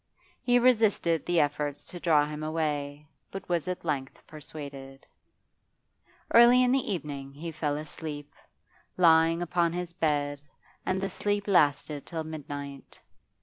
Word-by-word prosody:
He 245 -1 +3
resisted 220 -9 +2
the 175 -1 +2
efforts 145 -1 -1
to 175 - -9
draw 155 -4 +3
him 150 0 -6
away, 150 -2 -2 0.2
but 195 0 -8
was 175 -1 -1
at 180 -1 -4
length 135 -4 -3
persuaded. 140 -3 -10 1.3
Early 240 +2 +7
in 250 - +3
the 265 -3 +1
evening 140 -6 -5
he 165 +3 -6
fell 150 -2 -2
asleep, 150 -1 -7 0.6
lying 165 -1 +5
dressed 175 -1 -5
upon 170 -1 +2
his 175 -1 -4
bed, 145 -4 -1 0.5
and 185 0 +1
the 195 - -1
sleep 205 +1 -2
lasted 145 -5 +2
till 165 -1 -4
midnight. 145 -3 -8
160 Hz, 140 wpm, -28 LUFS, 145-180 Hz, 1.3 s, Early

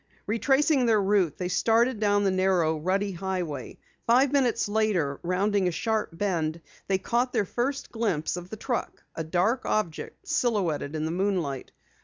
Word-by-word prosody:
Retracing 270 +4 +2
their 220 -2 +4
route, 195 -5 +2
they 180 - -2
started 225 +6 +2
down 205 -1 +2
the 195 - +2
narrow 185 -4 +2
rutty 195 +5 0
highway. 175 -7 -4 0.3
Five 255 +4 +4
minutes 265 -7 +2
later, 205 -10 0
rounding 190 +2 +1
a - - +1
sharp 220 +4 -1
bend, 165 -5 -1 0.3
they 195 - +2
caught 240 +6 0
their 205 - +1
first 260 +8 -2
glimpse 205 -11 -1
of 180 0 -7
the 220 - -7
truck, 240 +2 -3
a 160 - -4
dark 185 +10 +1
object 175 -7 -3
silhouetted 175 - 0
in 155 0 -2
the 160 - -2
moonlight. 175 -8 -1
195 Hz, 160 wpm, -27 LUFS, 175-225 Hz, 0.3 s, their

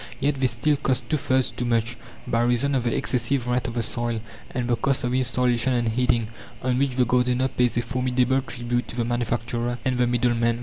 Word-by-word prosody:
Yet 140 0 0
they 130 - +4
still 135 +5 +1
cost 130 -2 -1
two 155 - +3
thirds 130 -2 +1
too - - -4
much, 115 0 0 0.3
by 115 - +1
reason 120 +4 +2
of 125 -3 0
the 120 - +1
excessive 125 +1 -1
rent 125 +1 0
of 120 - -5
the 120 - +1
soil 120 0 -1 0.3
and 125 -1 -3
the 120 - +2
cost 135 +4 0
of 125 0 -1
installation 125 0 +1
and 120 -2 +1
heating, 120 -1 +1 0.3
on 125 0 +1
which 135 -2 0
the 125 -1 +3
gardener 125 +2 +2
pays 125 -2 +1
a - - +3
formidable 125 +1 +1
tribute 120 -1 -3
to - - -6
the 120 -2 0
manufacturer 120 0 -1
and 130 -1 0
the 125 - +3
middleman. 120 -1 +1
125 Hz, 215 wpm, -24 LUFS, 120-130 Hz, 0.3 s, they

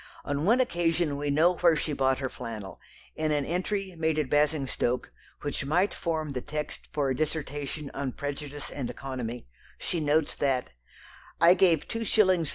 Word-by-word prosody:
On 145 +2 -1
one 235 +6 +5
occasion 170 - +1
we 145 +1 -2
know 165 +5 +4
where 170 -2 +5
she 150 0 -2
bought 135 -1 +2
her 130 - -2
flannel. 105 -4 -7 0.3
In 155 0 0
an 145 -2 +1
entry 190 +3 -2
(made 160 -1 0
at 150 -4 -1
Basingstoke) 145 -4 +1 0.3
which 145 -1 -2
might 175 +8 +2
form 160 -3 -2
the 130 -2 -3
text 150 +2 -5
for 140 -3 0
a - - 0
dissertation 145 -1 -3
on 135 -2 -3
prejudice 145 0 -5
and 130 -4 -4
economy, 125 - -5 0.3
she 175 - -2
notes 150 0 +2
that: 135 -3 0 0.7
"I 170 +1 +8
gave 175 -5 +3
2_s. 190 -7 +3
150 Hz, 165 wpm, -28 LUFS, 140-170 Hz, 0.7 s, I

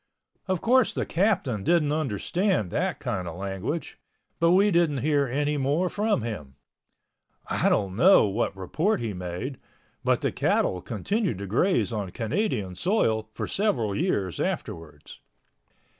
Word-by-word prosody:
Of 185 -3 -1
course 250 0 +3
the - - -2
Captain 165 - 0
didn't 160 - +2
understand 155 - 0
that - - -1
kind 90 -2 -3
of 85 - -6
language. 100 - -4 0.4
But 170 - +4
we 195 +4 +5
didn't 165 -7 +2
hear 145 -2 +2
anymore 145 +5 0
from 210 - 0
him. 80 - -6 0.9
I - - +1
don't 95 -2 0
know 185 - +6
what 100 0 -1
report 155 - 0
he 115 -3 -3
made—but 90 +9 -4
the - - 0
cattle 90 - +1
continued 165 - -2
to 100 - -5
graze 125 - +1
on 105 -4 -3
Canadian 115 - -2
soil 110 - 0
for - - -3
several 125 - 0
years 100 - -1
afterwards. 75 -3 -5
130 Hz, 135 wpm, -26 LUFS, -, 0.9 s, know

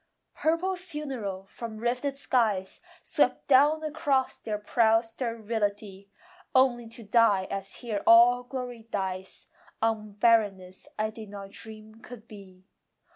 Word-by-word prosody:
Purple 335 +4 +1
funereal 270 - -5
from 220 +2 -8
rifted 250 +5 -2
skies 215 -8 0 0.2
Swept - - +1
down 290 +3 +5
across 290 -4 0
their 215 -1 -3
proud 225 +2 +2
sterility, 215 -4 -4 0.5
Only 245 -3 +3
to 230 +1 -8
die 210 -3 +3
as 195 0 -5
here 220 -5 -4
all 240 +2 +7
glory 245 -2 -7
dies, 190 -2 -5 0.3
On 220 -2 -1
barrenness 200 -4 +1
I 215 0 -1
did 220 -1 -10
not 200 -1 -9
dream 220 +1 -11
could 235 -2 -12
be. 190 -4 -14
225 Hz, 125 wpm, -28 LUFS, 205-250 Hz, 0.5 s, all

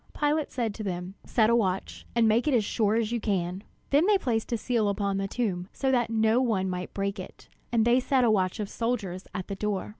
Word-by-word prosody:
Pilate 300 +1 +1
said 230 -5 -2
to 215 - -6
them: 180 -1 -4
"Set 225 -1 +3
a - - +5
watch, 195 -5 -1
and 230 -1 +4
make 225 +6 +2
it 285 - +3
as 220 -4 +2
sure 215 0 +1
as 225 -1 0
you 240 - 0
can." 190 -3 -2 0.3
Then 295 +6 +4
they 420 -1 +5
placed 235 - -2
a 235 - +1
seal 225 -2 0
upon 200 -1 -1
the 195 0 -1
stone, 190 -6 -2
so 265 -1 0
that 240 -3 +2
no 225 +2 +3
one 215 -7 +1
might 180 0 -4
break 200 0 -3
it; 185 - -10 0.2
and 230 -2 +3
they 240 +2 +5
set 260 0 +2
a 230 - +4
watch 185 -2 +1
of 210 - -2
soldiers 205 -6 -3
at 185 -2 -4
the 200 - -4
door. 205 -1 -2
220 Hz, 240 wpm, -27 LUFS, 195-240 Hz, 0.3 s, a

